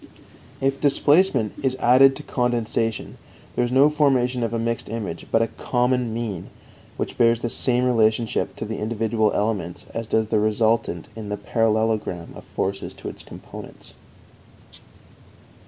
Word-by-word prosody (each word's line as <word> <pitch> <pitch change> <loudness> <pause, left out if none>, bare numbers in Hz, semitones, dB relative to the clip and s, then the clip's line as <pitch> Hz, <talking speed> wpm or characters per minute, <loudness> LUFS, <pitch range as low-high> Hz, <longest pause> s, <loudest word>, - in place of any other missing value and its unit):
If 135 0 0
displacement 145 - +3
is 130 -1 0
added 130 +2 +5
to 150 - -8
condensation, 115 -3 -1 0.4
there 125 - +2
is 120 - -1
no 135 +3 +6
formation 130 -5 +2
of 115 -2 -1
a 115 - -1
mixed 115 -1 -2
image, 105 -7 -5
but 115 - +4
a - - 0
common 125 -1 +1
mean 110 -5 -4 0.5
which - - -4
bears 115 -1 +4
the 120 - -2
same 125 -1 +1
relationship 115 -2 +1
to - - -5
the 110 0 -5
individual 110 0 0
elements 100 -5 -2
as 115 -1 -4
does 110 0 +1
the 110 - +2
resultant 110 -4 +1
in 110 -2 -7
the 105 - -2
parallelogram 110 -4 0
of - - -11
forces 95 +1 -3
to - - -7
its - - -10
components. - - -11
115 Hz, 150 wpm, -23 LUFS, 110-125 Hz, 0.5 s, no